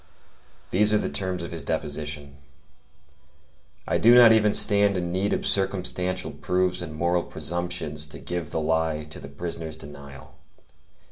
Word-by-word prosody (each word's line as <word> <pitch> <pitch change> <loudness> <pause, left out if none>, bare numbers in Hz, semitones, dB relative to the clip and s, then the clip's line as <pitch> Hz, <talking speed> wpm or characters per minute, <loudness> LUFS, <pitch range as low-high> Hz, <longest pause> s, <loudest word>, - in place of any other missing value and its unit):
These 105 +3 +3
are - - +5
the - - -2
terms 95 -3 -3
of 85 - -6
his 85 -1 -5
deposition: 75 -1 -4 1.5
'I - - +1
do 120 +2 +7
not 120 -2 +9
even 105 -1 +4
stand 100 -2 +4
in 85 -1 -2
need 95 +3 0
of - - -1
circumstantial 95 -2 0
proofs 90 0 -1
and 80 -3 -7
moral 85 +2 +1
presumptions 85 -4 -3
to - - -10
give 85 -3 -5
the - - -2
lie 80 -1 0
to 75 - -10
the 70 - -10
prisoner's 80 +1 -6
denial. 70 -2 -11
85 Hz, 150 wpm, -25 LUFS, 75-95 Hz, 1.5 s, not